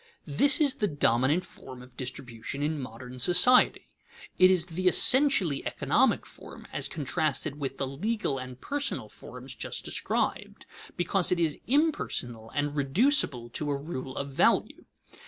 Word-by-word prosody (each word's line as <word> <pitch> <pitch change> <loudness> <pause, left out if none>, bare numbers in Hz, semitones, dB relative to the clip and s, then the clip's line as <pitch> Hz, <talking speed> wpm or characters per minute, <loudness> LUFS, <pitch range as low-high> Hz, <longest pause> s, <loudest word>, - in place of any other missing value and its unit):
_ - - -31 0.2
This 275 - +4
is 290 -4 +3
the 210 - -1
dominant 145 - +1
form 130 -2 -12
of 125 0 -18
distribution 125 +1 -6
in 150 -1 -2
modern 125 +1 -10
society. 180 - +5 0.5
It 185 0 +7
is 180 -3 +2
the 180 +1 -3
essentially 195 - +5
economic - - 0
form, - - -13
as - - -2
contrasted 150 -1 -3
with 135 -2 -5
the 135 - -2
legal 145 +1 -3
and 130 0 -9
personal 285 - -3
forms - - -10
just - - -5
described, - - -3 0.3
because 180 +1 +1
it 180 - +1
is 160 -3 -1
impersonal 230 - -1
and 145 0 -2
reducible 145 - +1
to 145 +5 -5
a 140 - -1
rule 135 -3 -7
of 140 0 -5
value. 135 - +1
145 Hz, 150 wpm, -27 LUFS, 130-185 Hz, 0.5 s, It